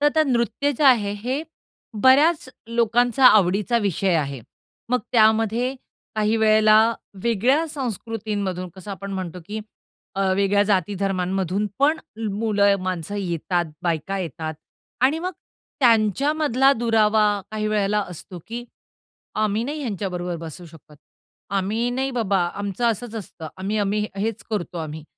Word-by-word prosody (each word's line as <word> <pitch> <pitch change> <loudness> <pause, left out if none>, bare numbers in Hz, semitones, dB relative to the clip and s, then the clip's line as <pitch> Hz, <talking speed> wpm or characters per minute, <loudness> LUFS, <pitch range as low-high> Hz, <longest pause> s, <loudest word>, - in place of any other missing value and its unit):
तर 295 - +5
ते 315 - +5
नृत्य 240 +2 0
जे 300 - +2
आहे 225 -7 +5
हे 265 +5 -1 0.6
बऱ्याच 285 +3 +5 0.2
लोकांचा 235 +2 +3
आवडीचा 210 +2 +4
विषय 195 -3 0
आहे. 140 -4 -2 0.5
मग 250 +1 +2
त्यामध्ये 225 +3 +3 0.4
काही 215 +1 +1
वेळेला 215 -1 +5 0.5
वेगळ्या 245 +8 +2
संस्कृतीमधून 215 - -3
कसं 190 +2 -9
आपण 195 0 -6
म्हणतो 185 -2 -5
की 215 +1 -4 0.5
अ, 195 - -2 0.2
वेगळ्या 200 +1 +3
जाती 200 -1 +1
धर्मांमधून 190 +1 0
पण 300 +4 +3 0.3
मुलं, 205 -1 +2
माणसं 185 +1 -3
येतात, 175 -1 -1 0.2
बायका 175 +3 -1
येतात 160 -2 -4 0.5
आणि 300 +5 +3
मग 365 +2 -3 0.5
त्यांच्यामधला 270 +4 +3
दुरावा 220 -3 +3 0.3
काही 215 0 -2
वेळेला 210 0 +1
असतो 180 +1 -9
की 235 +2 -6 0.8
"आम्ही 215 +2 0
नाही 295 +4 -4
ह्यांच्याबरोबर 180 -7 -3
बसू 170 +2 -9
शकत, 155 -2 -16 0.5
आम्ही 205 +5 0
नाही 265 +2 -1
बाबा, 215 -6 0 0.2
आमचं 200 +3 -3
असंच 230 +1 -5
असतं, 170 -7 -7
आम्ही 200 +3 -2
आम्ही 210 +1 0
हेच 215 +1 -2
करतो 180 -5 -3
आम्ही." 155 -1 -6
210 Hz, 130 wpm, -23 LUFS, 190-240 Hz, 0.8 s, तर